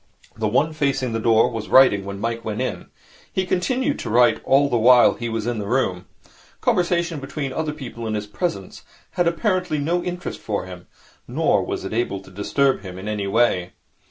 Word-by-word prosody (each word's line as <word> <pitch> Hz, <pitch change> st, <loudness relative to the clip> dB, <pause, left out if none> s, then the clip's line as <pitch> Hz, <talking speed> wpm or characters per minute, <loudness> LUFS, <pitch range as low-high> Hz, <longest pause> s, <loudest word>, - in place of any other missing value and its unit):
The 110 Hz, -1 st, -1 dB
one 150 Hz, +9 st, +1 dB
facing 135 Hz, -5 st, -1 dB
the 115 Hz, -, -1 dB
door 115 Hz, +1 st, +3 dB
was 115 Hz, -2 st, -5 dB
writing 115 Hz, -7 st, +5 dB
when 100 Hz, 0 st, -6 dB
Mike 115 Hz, +1 st, -3 dB
went 110 Hz, -1 st, -4 dB
in. -, -, -3 dB, 0.4 s
He 190 Hz, -, -1 dB
continued 255 Hz, +11 st, 0 dB
to 115 Hz, -, -5 dB
write 120 Hz, +2 st, +4 dB
all 140 Hz, +1 st, +4 dB
the 120 Hz, -4 st, +1 dB
time 125 Hz, +1 st, +6 dB
he 120 Hz, -1 st, -3 dB
was 110 Hz, -1 st, -3 dB
in 120 Hz, -2 st, -2 dB
the 100 Hz, -, -4 dB
room. 100 Hz, -8 st, -1 dB, 0.5 s
Conversation 170 Hz, -2 st, +1 dB
between 135 Hz, 0 st, -5 dB
other 155 Hz, 0 st, -2 dB
people 120 Hz, -6 st, -7 dB
in 110 Hz, -, -2 dB
his 105 Hz, -1 st, -3 dB
presence 105 Hz, -, -4 dB, 0.3 s
had 175 Hz, -1 st, +1 dB
apparently 180 Hz, -2 st, 0 dB
no 170 Hz, +5 st, 0 dB
interest 180 Hz, 0 st, -5 dB
for 105 Hz, -3 st, -3 dB
him, 90 Hz, -1 st, -11 dB, 0.4 s
nor -, -, +1 dB
was -, -, -4 dB
it 95 Hz, -, -5 dB
able 110 Hz, -4 st, -1 dB
to 95 Hz, -, -16 dB
disturb 135 Hz, +8 st, +1 dB
him 95 Hz, -2 st, -9 dB
in 95 Hz, +3 st, -7 dB
any 105 Hz, -2 st, -2 dB
way. 100 Hz, -4 st, +1 dB
120 Hz, 195 wpm, -22 LUFS, 105-155 Hz, 0.5 s, time